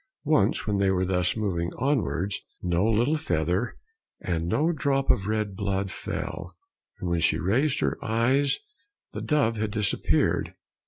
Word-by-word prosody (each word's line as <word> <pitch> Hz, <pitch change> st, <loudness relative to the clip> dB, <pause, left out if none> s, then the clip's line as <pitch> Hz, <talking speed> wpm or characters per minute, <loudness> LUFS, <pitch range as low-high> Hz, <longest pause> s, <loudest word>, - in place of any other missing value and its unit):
Once 115 Hz, -9 st, +2 dB
when 105 Hz, -2 st, 0 dB
they 100 Hz, -1 st, +3 dB
were 95 Hz, -1 st, +1 dB
thus 90 Hz, +2 st, +1 dB
moving 85 Hz, -5 st, -1 dB
onwards, 110 Hz, -, 0 dB, 0.2 s
no 90 Hz, 0 st, +1 dB
little 120 Hz, +8 st, +2 dB
feather 90 Hz, -, -1 dB, 0.4 s
and 85 Hz, -2 st, -2 dB
no 155 Hz, -, +2 dB
drop 140 Hz, -4 st, +1 dB
of 100 Hz, -, 0 dB
red 105 Hz, -2 st, -1 dB
blood 100 Hz, -1 st, -1 dB
fell, -, -, -5 dB, 0.4 s
and 90 Hz, -, -4 dB
when 85 Hz, -1 st, +1 dB
she 80 Hz, -, +2 dB
raised 130 Hz, +10 st, +1 dB
her -, -, -1 dB
eyes 130 Hz, +6 st, +2 dB, 0.6 s
the -, -, -4 dB
dove 140 Hz, -7 st, +1 dB
had 110 Hz, 0 st, -1 dB
disappeared. 105 Hz, -1 st, +1 dB
105 Hz, 150 wpm, -26 LUFS, 90-130 Hz, 0.6 s, they